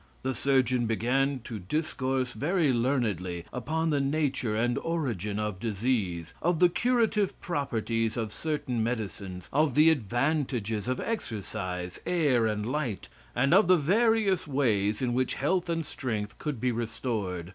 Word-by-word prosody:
The 130 Hz, 0 st, 0 dB
surgeon 130 Hz, -3 st, +2 dB
began 130 Hz, +4 st, +1 dB
to 115 Hz, -2 st, -6 dB
discourse 130 Hz, -, -1 dB
very 150 Hz, -, +1 dB
learnedly 105 Hz, -, 0 dB
upon 160 Hz, +6 st, -1 dB
the 145 Hz, -, +2 dB
nature 140 Hz, -5 st, 0 dB
and 120 Hz, +2 st, +1 dB
origin 115 Hz, -, -2 dB
of 105 Hz, -3 st, -2 dB
disease; 105 Hz, -6 st, -1 dB
of 175 Hz, 0 st, +2 dB
the 180 Hz, +2 st, +6 dB
curative 225 Hz, -1 st, +1 dB
properties 115 Hz, -8 st, -1 dB
of 110 Hz, -3 st, -2 dB
certain 145 Hz, -7 st, -2 dB
medicines; 100 Hz, -6 st, -4 dB
of 145 Hz, -2 st, +2 dB
the 155 Hz, +2 st, +7 dB
advantages 120 Hz, -4 st, 0 dB
of 130 Hz, 0 st, -1 dB
exercise, 90 Hz, -, -4 dB
air 140 Hz, -10 st, +3 dB
and 105 Hz, -1 st, -1 dB
light, 125 Hz, -5 st, -3 dB, 0.3 s
and 140 Hz, +5 st, +3 dB
of 195 Hz, 0 st, +6 dB
the 185 Hz, 0 st, +6 dB
various 200 Hz, +3 st, +2 dB
ways 115 Hz, -5 st, +1 dB
in 120 Hz, -1 st, +1 dB
which 130 Hz, +1 st, 0 dB
health 175 Hz, +5 st, 0 dB
and 165 Hz, -1 st, -1 dB
strength 110 Hz, -8 st, -4 dB
could 150 Hz, -6 st, -3 dB
be 125 Hz, +2 st, +1 dB
restored. 110 Hz, -6 st, -3 dB
125 Hz, 145 wpm, -28 LUFS, 110-155 Hz, 0.3 s, the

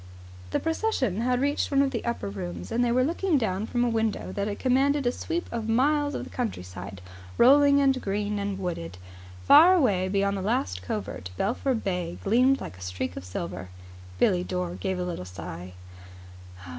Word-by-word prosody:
The -, -, 0 dB
procession 320 Hz, -, -1 dB
had 250 Hz, +1 st, +1 dB
reached 285 Hz, +1 st, 0 dB
one 275 Hz, -1 st, +3 dB
of 275 Hz, -, 0 dB
the 235 Hz, -, -3 dB
upper 235 Hz, -, -2 dB
rooms, 90 Hz, -2 st, -6 dB
and 245 Hz, -, +2 dB
they 240 Hz, -, +2 dB
were 255 Hz, +1 st, +3 dB
looking 335 Hz, +3 st, +1 dB
down 215 Hz, -3 st, -1 dB
from 245 Hz, -1 st, 0 dB
a -, -, +2 dB
window 225 Hz, -2 st, -1 dB
that 200 Hz, 0 st, -3 dB
commanded 270 Hz, +2 st, +2 dB
a 245 Hz, -, +3 dB
sweep 340 Hz, +6 st, -3 dB
of 225 Hz, -2 st, -3 dB
miles 290 Hz, +5 st, +2 dB
of -, -, -3 dB
the -, -, -10 dB
countryside, 95 Hz, -, -5 dB, 0.4 s
rolling 280 Hz, +3 st, +6 dB
and 270 Hz, -2 st, +2 dB
green 205 Hz, +1 st, -2 dB
and 200 Hz, -1 st, -2 dB
wooded. 130 Hz, -, -4 dB, 0.5 s
Far 330 Hz, +6 st, +8 dB
away 200 Hz, -, +2 dB
beyond 200 Hz, +1 st, +1 dB
the -, -, -3 dB
last 95 Hz, -, -1 dB
covert 95 Hz, -1 st, -5 dB
Belpher 250 Hz, +5 st, 0 dB
Bay 180 Hz, -5 st, -3 dB
gleamed 255 Hz, +6 st, +3 dB
like 95 Hz, -, -8 dB
a -, -, -14 dB
streak 90 Hz, -1 st, -4 dB
of -, -, -6 dB
silver. 90 Hz, 0 st, -6 dB, 0.5 s
Billie 180 Hz, -, +3 dB
Dore 180 Hz, -1 st, -3 dB
gave 190 Hz, +1 st, -3 dB
a 180 Hz, -, -2 dB
little 175 Hz, -, -4 dB
sigh. 90 Hz, 0 st, -8 dB
205 Hz, 180 wpm, -26 LUFS, -, 0.5 s, Far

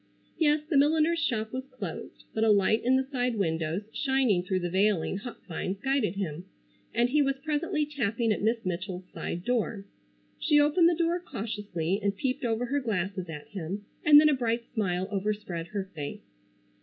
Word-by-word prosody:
Yes, 300 Hz, -2 st, +3 dB
the 310 Hz, -, +2 dB
milliner's 315 Hz, +3 st, +4 dB
shop 220 Hz, -4 st, -1 dB
was 260 Hz, +1 st, -4 dB
closed, 225 Hz, -, -7 dB
but 220 Hz, -, 0 dB
a 225 Hz, -, +4 dB
light 210 Hz, +2 st, +4 dB
in 255 Hz, +2 st, +4 dB
the 265 Hz, -, +3 dB
side 250 Hz, -3 st, 0 dB
windows 165 Hz, 0 st, -1 dB
shining 265 Hz, -9 st, +2 dB
through 185 Hz, 0 st, -1 dB
the 175 Hz, -, -1 dB
veiling 190 Hz, -1 st, +2 dB
hop 235 Hz, +4 st, -9 dB
vines 185 Hz, +2 st, -3 dB
guided 265 Hz, -6 st, 0 dB
him, 175 Hz, -4 st, -4 dB, 0.5 s
and 240 Hz, +1 st, +2 dB
he 300 Hz, +1 st, +4 dB
was 275 Hz, -1 st, +2 dB
presently 300 Hz, 0 st, 0 dB
tapping 235 Hz, -5 st, 0 dB
at 210 Hz, -, 0 dB
Miss 225 Hz, +1 st, 0 dB
Mitchell's 185 Hz, 0 st, -4 dB
side 175 Hz, -, -4 dB
door. 225 Hz, -4 st, -1 dB, 0.5 s
She 300 Hz, -2 st, +4 dB
opened 305 Hz, +4 st, +5 dB
the 345 Hz, -, +1 dB
door 340 Hz, +1 st, +1 dB
cautiously 200 Hz, -, -3 dB
and 200 Hz, -1 st, 0 dB
peeped 255 Hz, +5 st, -1 dB
over 235 Hz, 0 st, 0 dB
her 285 Hz, +4 st, 0 dB
glasses 190 Hz, -6 st, -2 dB
at 150 Hz, -2 st, -8 dB
him, 195 Hz, +1 st, -5 dB, 0.2 s
and 295 Hz, -1 st, +9 dB
then 305 Hz, -, +6 dB
a 300 Hz, -, +4 dB
bright 235 Hz, -3 st, 0 dB
smile 185 Hz, -4 st, 0 dB
overspread 195 Hz, -4 st, -2 dB
her 200 Hz, +2 st, -3 dB
face. 145 Hz, -3 st, -6 dB
220 Hz, 180 wpm, -28 LUFS, 190-270 Hz, 0.5 s, and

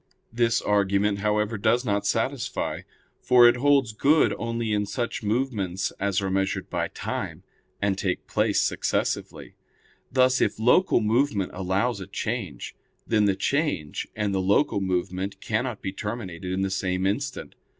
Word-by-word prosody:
This 115 Hz, -1 st, +1 dB
argument, 100 Hz, 0 st, +2 dB
however, 105 Hz, +1 st, 0 dB
does 120 Hz, +4 st, +2 dB
not 100 Hz, -2 st, 0 dB
satisfy. -, -, -1 dB, 0.4 s
For 125 Hz, -1 st, +7 dB
it 120 Hz, +1 st, +4 dB
holds 135 Hz, -3 st, +3 dB
good 150 Hz, +8 st, +3 dB
only 115 Hz, -1 st, -2 dB
in 105 Hz, -1 st, 0 dB
such 120 Hz, +2 st, -3 dB
movements 105 Hz, -5 st, -1 dB
as 100 Hz, 0 st, 0 dB
are 95 Hz, -, -1 dB
measured 95 Hz, 0 st, -1 dB
by -, -, -1 dB
time, -, -, -5 dB, 0.4 s
and 100 Hz, -1 st, +1 dB
take 95 Hz, -1 st, -2 dB
place -, -, +1 dB
successively; -, -, -1 dB, 0.6 s
thus, 130 Hz, -1 st, +3 dB
if -, -, +1 dB
local 125 Hz, -, +4 dB
movement 110 Hz, -3 st, +1 dB
follows 95 Hz, +5 st, -1 dB
a 95 Hz, -, -7 dB
change, -, -, -4 dB, 0.3 s
then 105 Hz, -2 st, +2 dB
the 100 Hz, -2 st, +2 dB
change 115 Hz, -, -1 dB
and 105 Hz, -2 st, -1 dB
the 95 Hz, -, +1 dB
local 100 Hz, +3 st, +2 dB
movement 95 Hz, +1 st, -2 dB
cannot 115 Hz, +1 st, -2 dB
be 95 Hz, -, -2 dB
terminated 95 Hz, -5 st, -5 dB
in 95 Hz, +1 st, 0 dB
the 95 Hz, -, -1 dB
same 95 Hz, -1 st, -1 dB
instant. 100 Hz, +1 st, -2 dB
105 Hz, 150 wpm, -25 LUFS, 95-120 Hz, 0.6 s, For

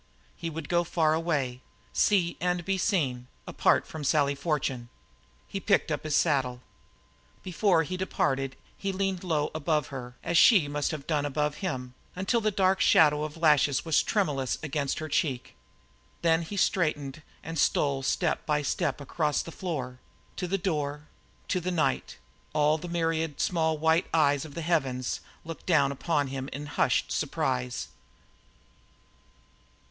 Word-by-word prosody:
He 165 Hz, -, -4 dB
would 160 Hz, -1 st, -6 dB
go 175 Hz, 0 st, +2 dB
far 160 Hz, -2 st, +2 dB
away 145 Hz, -7 st, -1 dB, 0.3 s
see 180 Hz, -5 st, +2 dB
and 180 Hz, -1 st, 0 dB
be 195 Hz, 0 st, 0 dB
seen 135 Hz, -, 0 dB, 0.2 s
apart -, -, +2 dB
from 155 Hz, -2 st, -7 dB
Sally 145 Hz, -1 st, +2 dB
Fortune. 140 Hz, -5 st, -2 dB, 0.6 s
He 195 Hz, -, -4 dB
picked 200 Hz, -4 st, +2 dB
up 150 Hz, -, -2 dB
his 155 Hz, -1 st, 0 dB
saddle. 130 Hz, -5 st, +1 dB, 0.8 s
Before 180 Hz, -2 st, +2 dB
he 185 Hz, +4 st, -4 dB
departed 135 Hz, -7 st, -1 dB, 0.2 s
he 195 Hz, -, -3 dB
leaned 190 Hz, -1 st, -2 dB
low 155 Hz, -4 st, 0 dB
above 155 Hz, -2 st, 0 dB
her 125 Hz, -3 st, -7 dB
as 165 Hz, 0 st, +3 dB
she 190 Hz, -11 st, +6 dB
must 145 Hz, 0 st, -1 dB
have 150 Hz, -4 st, -5 dB
done 150 Hz, -3 st, 0 dB
above 150 Hz, +1 st, -1 dB
him, 130 Hz, -10 st, -4 dB, 0.2 s
until 190 Hz, +6 st, +1 dB
the 215 Hz, -, +2 dB
dark 190 Hz, -2 st, +2 dB
shadow 150 Hz, -1 st, +5 dB
of 155 Hz, +1 st, -5 dB
lashes 150 Hz, -4 st, +3 dB
was 160 Hz, -2 st, +3 dB
tremulous 145 Hz, -, 0 dB
against 145 Hz, -2 st, -1 dB
her 155 Hz, -, -4 dB
cheek. 140 Hz, -5 st, -1 dB, 0.7 s
Then 165 Hz, 0 st, +4 dB
he 185 Hz, +5 st, -6 dB
straightened 155 Hz, -6 st, 0 dB, 0.2 s
and 165 Hz, 0 st, -4 dB
stole 140 Hz, -1 st, +2 dB
step 160 Hz, +5 st, 0 dB
by 150 Hz, -1 st, 0 dB
step 145 Hz, -, -1 dB
across 150 Hz, +2 st, 0 dB
the 165 Hz, -, -8 dB
floor, 135 Hz, -9 st, -4 dB, 0.4 s
to 180 Hz, -, -3 dB
the 195 Hz, +3 st, 0 dB
door, 150 Hz, -5 st, -3 dB, 0.4 s
to 185 Hz, -, +1 dB
the 180 Hz, -, -2 dB
night; 170 Hz, -3 st, 0 dB, 0.4 s
all 150 Hz, +1 st, +3 dB
the 175 Hz, -, -7 dB
myriad 165 Hz, -3 st, -1 dB
small 160 Hz, -3 st, +1 dB
white 160 Hz, +3 st, +2 dB
eyes 145 Hz, -3 st, +3 dB
of 145 Hz, -, -11 dB
the 170 Hz, -, -4 dB
heavens 135 Hz, -7 st, 0 dB, 0.3 s
looked 165 Hz, 0 st, -8 dB
down 140 Hz, -5 st, +3 dB
to 150 Hz, 0 st, 0 dB
him 135 Hz, 0 st, -5 dB
in 145 Hz, +2 st, -5 dB
hushed 145 Hz, -, +1 dB
surprise. 125 Hz, -1 st, -1 dB
155 Hz, 155 wpm, -28 LUFS, 140-170 Hz, 0.8 s, she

